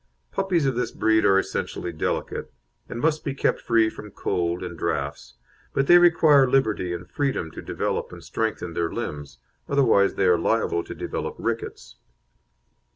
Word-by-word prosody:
Puppies 180 -6 0
of 135 - +2
this 125 - -1
breed 110 0 +2
are 95 - +5
essentially 90 -2 -2
delicate, 75 - -3 0.4
and 115 - -5
must 155 +2 +1
be 140 -2 -3
kept - - 0
free 115 -1 +3
from 105 -1 -8
cold 85 -2 -2
and 90 -1 -6
draughts, 65 -5 -3 0.4
but 135 - +2
they 175 +4 +8
require 155 -6 +5
liberty 110 -9 +1
and 85 +1 -5
freedom 135 - -2
to - - -8
develop - - -3
and - - -11
strengthen 110 -6 -3
their 85 0 -1
limbs, 75 -4 -6 0.3
otherwise 120 -8 +3
they 100 - +1
are 90 -2 +4
liable 85 -3 +1
to - - -8
develop - - -4
rickets. - - -4
110 Hz, 160 wpm, -24 LUFS, 85-135 Hz, 0.4 s, they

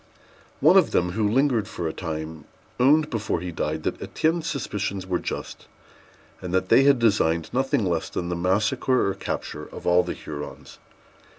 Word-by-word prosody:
One - - +7
of - - +5
them, 90 0 +1
who 105 +2 0
lingered 125 -3 +2
for 85 -6 -4
a 80 - -3
time, 80 -2 -6 0.3
owned 150 +4 +4
before 105 -6 -1
he 90 +1 -5
died 80 -1 -3
that - - -2
Étienne's 160 +1 -1
suspicions 100 -8 -3
were 90 -2 -1
just, - - -6 0.7
and 90 - -5
that 95 0 0
they 135 - +6
had 140 -1 +6
designed 85 -8 +1
nothing 130 -4 +1
less 85 -3 -1
than 85 - -3
the 90 - -1
massacre 100 +8 +1
or 100 - 0
capture - - -5
of - - -10
all 90 0 +5
the - - -4
Hurons. 75 -1 -9
95 Hz, 175 wpm, -24 LUFS, 85-125 Hz, 0.7 s, One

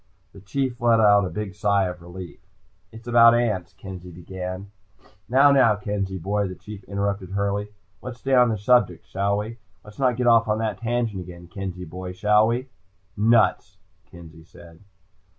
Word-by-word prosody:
The 100 - -13
Chief 125 +4 -3
let 115 -1 +4
out 105 -2 +5
a - - -5
big 105 -2 -5
sigh 100 -1 +1
of 90 -1 -6
relief. 90 +1 -10 0.5
"It's 115 +2 -13
about 120 -1 +6
ants," 105 -6 -1
Kenzie 90 -2 -10
began. 90 +2 -7 0.6
"Now, 135 +3 +6
now, 130 -6 +5
Kenzie 100 -1 -3
boy," 100 +3 -1
the 95 - -7
Chief 100 +3 -11
interrupted 100 -1 -3
hurriedly. 100 +1 -2 0.3
"Let's 125 -1 -7
stay 135 +1 -2
on 125 -2 +5
the 110 - -1
subject, 105 -4 +2
shall 100 +1 -1
we? 110 +3 -5 0.2
Let's 105 +3 -15
not 130 -3 +2
get 125 - -1
off 115 -1 +5
on 105 0 +1
that 110 -3 -3
tangent 115 -4 -2
again, 85 -1 -11
Kenzie 90 -1 -6
boy. 90 +3 -7
Shall 105 +3 +3
we?" 125 +3 -2 0.5
"Nuts," 105 -4 +2 0.3
Kenzie 80 -2 -14
said. 85 0 -16
100 Hz, 170 wpm, -23 LUFS, 95-115 Hz, 0.6 s, about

